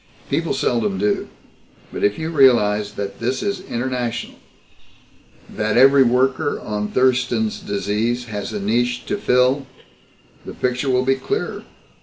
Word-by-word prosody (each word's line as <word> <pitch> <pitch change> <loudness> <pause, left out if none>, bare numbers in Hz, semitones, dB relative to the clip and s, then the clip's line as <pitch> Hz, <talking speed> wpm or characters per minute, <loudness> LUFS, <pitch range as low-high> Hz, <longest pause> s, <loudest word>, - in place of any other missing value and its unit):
"People - - 0
seldom 105 -5 0
do. 105 +2 0 0.7
But - - -4
if 105 0 +2
you 160 +1 -3
realize 105 -8 +3
that 100 -1 -5
this 125 - -2
is 200 -2 -2
international, 125 -4 -3 1.1
that 110 +1 -1
every 135 +2 +7
worker 130 +3 +2
on 105 -1 -3
Thurston's 130 - +1
Disease 110 - -2
has 105 -2 -5
a 105 - -3
niche 120 +4 0
to - - -2
fill, 130 -5 +2 0.8
the - - -9
picture 125 +2 -1
will 130 0 +2
be 135 - +4
clearer. 410 - -4
125 Hz, 135 wpm, -20 LUFS, 105-130 Hz, 1.1 s, every